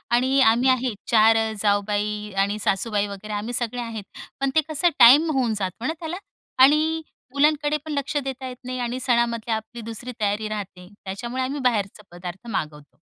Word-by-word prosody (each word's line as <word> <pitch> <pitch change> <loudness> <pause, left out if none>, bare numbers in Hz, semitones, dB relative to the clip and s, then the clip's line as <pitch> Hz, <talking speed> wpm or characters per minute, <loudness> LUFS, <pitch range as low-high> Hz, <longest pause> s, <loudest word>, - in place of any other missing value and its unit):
आणि 260 +3 +2
आम्ही 240 +2 +4
आहे, 255 -2 +1
4 225 -1 +5 0.2
जाऊबाई 210 0 0
आणि 200 +1 -2
सासूबाई 205 +1 0
वगैरे 200 +1 -7
आम्ही 210 +4 -3
सगळे 245 0 -2
आहेत. 225 -3 -6 0.4
पण 275 0 +1
ते 315 - +5
कसं 310 +3 +2
टाईम 285 +7 +8
होऊन 255 -6 +1
जातो 195 +4 -4
ना 315 - 0
त्याला? 330 +1 -5 0.5
आणि 310 +3 +4 0.3
मुलांकडे 295 +1 +2
पण 310 - -5
लक्ष 280 +1 -2
देता 265 0 -5
येत 250 -1 -8
नाही 255 0 -4
आणि 245 +1 -2
सणामधले 235 -2 0
आपली 220 +2 -5
दुसरी 230 +2 -6
तयारी 210 +1 0
राहते, 195 -4 -6 0.2
त्याच्यामुळे 240 +7 -4
आम्ही 275 +3 -3
बाहेरचे 210 -4 0
पदार्थ 175 +5 -9
मागवतो. 150 -7 -5
235 Hz, 170 wpm, -23 LUFS, 210-260 Hz, 0.5 s, टाईम